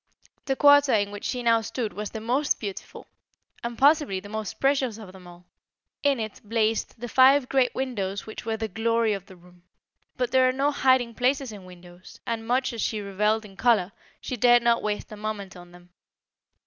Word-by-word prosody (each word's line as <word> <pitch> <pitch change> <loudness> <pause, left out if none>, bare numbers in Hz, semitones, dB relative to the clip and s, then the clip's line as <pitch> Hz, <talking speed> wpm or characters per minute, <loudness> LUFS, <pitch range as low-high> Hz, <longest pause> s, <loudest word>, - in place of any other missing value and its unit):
The 270 - 0
quarter 285 0 +5
in 205 -2 +1
which 205 0 -8
she 250 -1 -3
now 230 -1 +3
stood 225 0 -4
was 210 -1 -5
the 220 - -7
most 255 +6 0
beautiful, 200 -3 -7 0.6
and, 235 0 -5
possibly, 285 -8 +3
the 205 +2 -12
most 215 -1 -5
precious 270 -5 +1
of 210 -4 -11
them 185 -1 -14
all. 175 0 -15 0.6
In 280 -3 +2
it 220 -1 -6
blazed 220 +1 -1
the 240 - -5
five 260 +2 +5
great 265 -2 +1
windows 205 -7 -3
which 220 - -8
were 225 0 -2
the 220 0 -3
glory 225 +1 0
of 195 -1 -6
the 190 - -14
room; 180 0 -20 0.6
but 250 -1 -1
there 260 -1 +4
are - - -1
no 275 +2 +1
hiding 260 -4 +2
places 260 +1 0
in 200 -3 -11
windows, 180 0 -15
and 230 -2 -4
much 255 +1 0
as 230 - -4
she 215 - -1
revelled 210 +2 0
in 195 -2 -14
colour, 205 -4 +2 0.3
she 255 - -5
dared 240 +1 +4
not 235 -1 +3
waste 210 0 -4
a - - -7
moment 210 -2 -6
on 175 -1 -13
them. 175 0 -17
225 Hz, 200 wpm, -25 LUFS, 205-255 Hz, 0.6 s, quarter